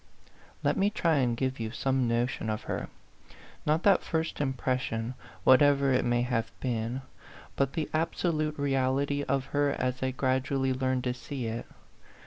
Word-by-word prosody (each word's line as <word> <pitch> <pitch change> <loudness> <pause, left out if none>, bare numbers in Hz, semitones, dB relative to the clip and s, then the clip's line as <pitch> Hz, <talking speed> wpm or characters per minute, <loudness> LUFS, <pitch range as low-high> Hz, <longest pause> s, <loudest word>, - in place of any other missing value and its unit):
Let - - +2
me 200 +1 +3
try 170 -7 +1
and 120 -3 +1
give 130 0 -1
you 110 -1 -2
some 130 +1 0
notion 115 -1 0
of 110 0 -2
her: - - -4 0.8
not 155 +3 +2
that 200 -3 +5
first 160 -2 -2
impression, 130 -3 -1 0.3
whatever 140 0 +5
it 130 - +3
may 120 0 +2
have 115 -2 -1
been, 120 +1 -2 0.5
but 140 0 +1
the 155 -2 -1
absolute 155 -1 0
reality 140 0 +1
of 135 -2 0
her 145 0 +3
as 125 0 -1
I 130 - +1
gradually 130 +1 0
learned 130 -1 0
to 125 - 0
see 125 +1 -5
it. 115 +1 -4
130 Hz, 155 wpm, -29 LUFS, 125-145 Hz, 0.8 s, that